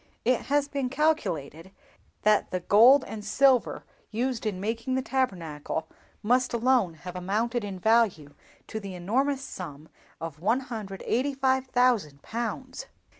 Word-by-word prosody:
It 250 0 +1
has 285 0 +2
been 275 -3 -2
calculated 190 - -1 0.5
that 210 -1 +3
the 185 - -2
gold 235 +9 +6
and 215 -1 -7
silver 255 +3 +3 0.3
used 240 0 -2
in 195 -3 -2
making 230 +5 -2
the 260 - 0
Tabernacle 170 - -2 0.4
must 250 +3 +2
alone 235 -7 +2
have 180 +3 -9
amounted 220 +6 -1
in 200 -2 -5
value 195 -8 +2 0.3
to 220 - -5
the 195 -3 -7
enormous 260 +10 0
sum 155 - -8 0.3
of 160 -3 -6
185,000 245 - 0
pounds!" 235 +3 -5
225 Hz, 125 wpm, -27 LUFS, 185-260 Hz, 0.5 s, gold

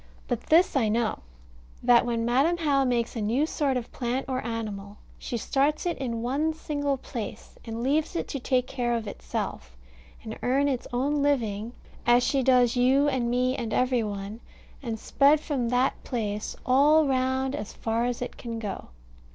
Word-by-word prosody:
But - - -1
this 335 +2 +4
I 230 -6 +2
know: 225 0 0 0.6
that 245 0 +5
when 230 -1 0
Madam 275 +9 +2
How 285 -5 +2
makes 240 -2 0
a 225 - -2
new 235 +8 +1
sort 285 -4 0
of 240 - -6
plant 250 +1 -2
or 260 -1 -2
animal, 210 -3 -5 0.2
she 240 - -4
starts 280 +7 0
it 350 - 0
in 235 -4 -3
one 290 +6 0
single 285 -3 -2
place, 240 -4 -7
and 230 0 -4
leaves 300 +6 +1
it - - -2
to 275 - -3
take 255 0 +1
care 245 -3 -1
of 230 -1 -3
itself - - -5 0.5
and - - -7
earn 270 +3 +2
its 260 -3 -2
own 280 +4 0
living 230 -6 0 0.3
as 240 +1 +4
she 275 +1 +1
does 250 -2 +4
you 260 +4 +4
and 255 -4 0
me 250 +1 +1
and 230 -4 -3
every 255 -1 +2
one 205 0 -5 0.4
and 230 -4 -3
spread 285 +6 +3
from 270 -6 -2
that 250 +2 +1
place 215 -4 -3
all 295 +4 +5
round 260 0 0
as 280 -8 -5
far 225 +1 -1
as 245 0 -2
it - - -7
can 230 -1 -5
go. 210 -3 -5
250 Hz, 180 wpm, -27 LUFS, 230-275 Hz, 0.6 s, that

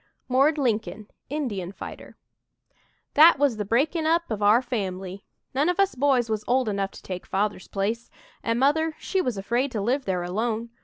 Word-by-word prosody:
"MORD" 275 +5 +3
LINCOLN, 220 -5 -1 0.2
INDIAN 210 - -3
FIGHTER - - -10 1.0
"That 315 +1 +8
was 275 -5 +2
the 210 - -2
breaking 310 - +1
up 335 -3 +1
of 215 -1 -2
our 210 +3 +6
family. 195 -5 -4 0.3
None 285 +6 +2
of 360 +2 -1
us 395 0 +3
boys 260 -3 +2
was 215 -1 -2
old 255 -1 +2
enough 200 -2 -1
to - - -13
take 180 -1 -6
Father's 200 -1 -1
place, 215 +4 -2 0.3
an' 230 0 0
Mother 310 +5 +2
she 380 - -1
was 250 - -2
afraid 240 +7 0
to 220 - -1
live 255 +7 0
there 180 -2 -1
alone. 225 +5 -2
235 Hz, 175 wpm, -25 LUFS, 205-285 Hz, 1.0 s, That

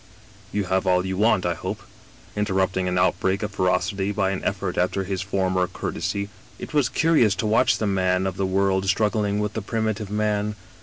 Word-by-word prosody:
You 105 - 0
have 95 +1 0
all 90 0 +3
you 95 0 -2
want, 105 -2 +2
I 90 - +1
hope,' - - -5 0.5
interrupting 95 -2 0
an 90 0 0
outbreak 95 +2 +1
of 105 - -3
ferocity 95 +1 0
by 100 -2 0
an 95 - -4
effort - - -2
after 90 +2 0
his 95 -1 -3
former 95 -2 0
cour - - -4
tesy. 100 0 -3
" - - -25
It - - -8
was 145 -5 +3
curious 130 -7 +3
to 95 - -2
watch 110 +1 +3
the 110 - -1
man 95 -2 +1
of 95 -1 -2
the 95 -1 -1
world 95 0 +1
strug 105 +2 +2
gling 105 -2 0
with 105 0 -1
the 110 - -3
primitive 110 -1 -2
man. 105 0 0
95 Hz, 205 wpm, -24 LUFS, 95-105 Hz, 0.5 s, all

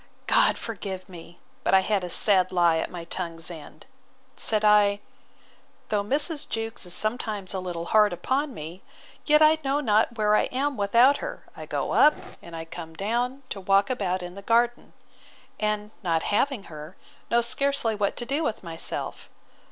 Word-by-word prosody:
God - - +3
forgive 195 -4 -6
me, 175 -2 -12 0.3
(but - - +3
I 190 - +6
had 200 -1 0
a 180 - -4
sad 190 0 +4
lie 170 -2 +3
at - - -3
my 175 -2 -7
tongue's 170 -1 -5
end,) 160 -4 -11 0.5
said 215 -1 +1
I; 205 -1 +5 0.9
Though 205 -1 +1
Mrs. 290 - 0
Jewkes 225 -3 -4
is 175 - -5
sometimes 215 -3 -2
a 190 - -2
little 175 -2 -5
hard 215 -1 +5
upon 265 - -1
me, 165 -2 -9 0.5
yet 300 0 +6
I 310 +1 +5
know 275 +1 +1
not 225 -2 +2
where 210 -1 +3
I - - +3
am 275 +2 -2
without 235 +7 +4
her: - - -7
I - - -9
go - - -2
up, 300 - +5 0.3
and 170 - -10
I 165 0 -6
come 165 -1 -9
down 240 +8 -2
to 195 - -5
walk 195 +4 +3
about 185 -6 -1
in 175 0 -7
the 200 - -9
garden; 235 +3 +1 0.7
and, 210 0 -1
not 165 -4 0
having 265 0 +1
her, 155 0 -10 0.3
know 235 0 +3
scarcely 275 -1 0
what 205 -1 -1
to 240 - -3
do 280 +6 -1
with 220 - -3
myself. 165 -2 -5
210 Hz, 175 wpm, -26 LUFS, 180-240 Hz, 0.9 s, I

